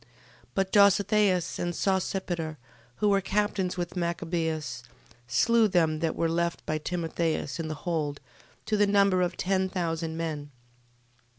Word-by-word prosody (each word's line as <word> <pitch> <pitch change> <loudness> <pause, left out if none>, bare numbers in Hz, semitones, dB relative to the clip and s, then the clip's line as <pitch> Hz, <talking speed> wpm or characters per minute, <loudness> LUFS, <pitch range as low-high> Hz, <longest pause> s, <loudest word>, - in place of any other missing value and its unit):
But 195 -1 0
Dositheus, 200 -2 +3
and 175 0 -1
Sosipater, 180 -4 -1 0.4
who 210 - +1
were 200 -1 +3
captains 195 -2 -1
with 175 0 -4
Machabeus, 160 -6 -2 0.5
slew 220 - +4
them 165 -5 +2
that 165 -1 -1
were 165 - +1
left 170 +1 -1
by 155 0 -1
Timotheus 165 -1 -2
in 165 - -2
the 155 - -4
hold, 155 -5 -1 0.5
to 215 -1 0
the 205 0 +4
number 200 -2 +4
of 175 -1 -1
ten 190 0 +1
thousand 165 -3 -2
men. 155 -3 -4
175 Hz, 135 wpm, -28 LUFS, 160-195 Hz, 0.5 s, slew